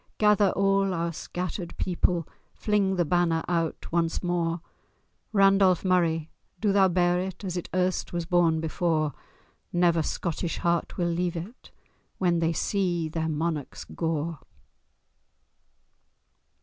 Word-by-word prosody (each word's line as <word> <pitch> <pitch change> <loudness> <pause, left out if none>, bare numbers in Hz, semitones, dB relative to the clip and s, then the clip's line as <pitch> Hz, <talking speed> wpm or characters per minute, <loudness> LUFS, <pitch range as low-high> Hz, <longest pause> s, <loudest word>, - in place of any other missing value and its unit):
Gather 210 -2 +4
all 195 -1 +2
our 170 0 -2
scattered 180 +2 -5
people, 175 -2 0 0.3
Fling 205 -3 +1
the 175 -2 +1
banner 165 0 +1
out 165 -2 -2
once 165 0 0
more— 175 -1 0 0.7
Randolph 195 -3 +4
Murray! 165 -4 +1 0.3
do 210 -2 +2
thou 195 -1 +5
bear 175 0 +2
it, 185 +1 -5
As 185 -2 -3
it 175 - -4
erst 185 0 0
was 175 -1 -2
borne 170 -2 +3
before: 160 -2 0 0.6
Never 175 -2 +3
Scottish 170 +2 -3
heart 170 -1 -1
will 175 - +1
leave 175 +1 -1
it, 195 +10 -9 0.5
When 175 -2 +2
they 165 0 +1
see 175 -2 0
their 160 0 -2
monarch's 155 -2 -3
gore!" 165 -1 -3
175 Hz, 125 wpm, -27 LUFS, 165-185 Hz, 0.7 s, thou